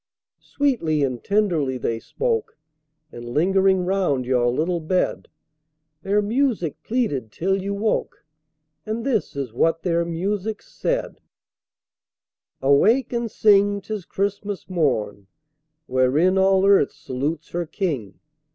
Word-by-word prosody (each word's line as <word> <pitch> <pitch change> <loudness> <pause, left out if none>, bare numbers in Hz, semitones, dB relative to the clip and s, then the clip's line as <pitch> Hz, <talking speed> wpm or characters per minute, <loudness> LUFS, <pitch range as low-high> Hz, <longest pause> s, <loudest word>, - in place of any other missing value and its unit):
Sweetly 190 - 0
and 130 -3 -2
tenderly 175 -11 +1
they 115 -2 -2
spoke, 455 - -2 0.5
And 120 - -9
lingering 185 +8 +2
round 180 -9 0
your 125 -1 +2
little 165 +8 0
bed, 180 +3 -1 0.7
Their 205 +2 +1
music 225 - 0
pleaded 180 - -2
till 190 +7 -1
you 200 +1 -3
woke, 210 -6 -2 0.6
And 220 +2 -4
this 235 - -1
is 135 -5 -4
what 165 +6 +1
their 170 -2 +1
music 195 +5 -3
said: - - -3 1.4
"Awake 215 - +3
and 235 -1 -1
sing! 205 -1 +4
'tis 200 -1 -6
Christmas 200 0 -3
morn, 125 - -1 0.6
Whereon 130 +9 +2
all 190 0 +4
earth 200 -8 +4
salutes 145 +4 -4
her 175 -1 -3
King! 145 - -3
185 Hz, 115 wpm, -23 LUFS, 140-205 Hz, 1.4 s, sing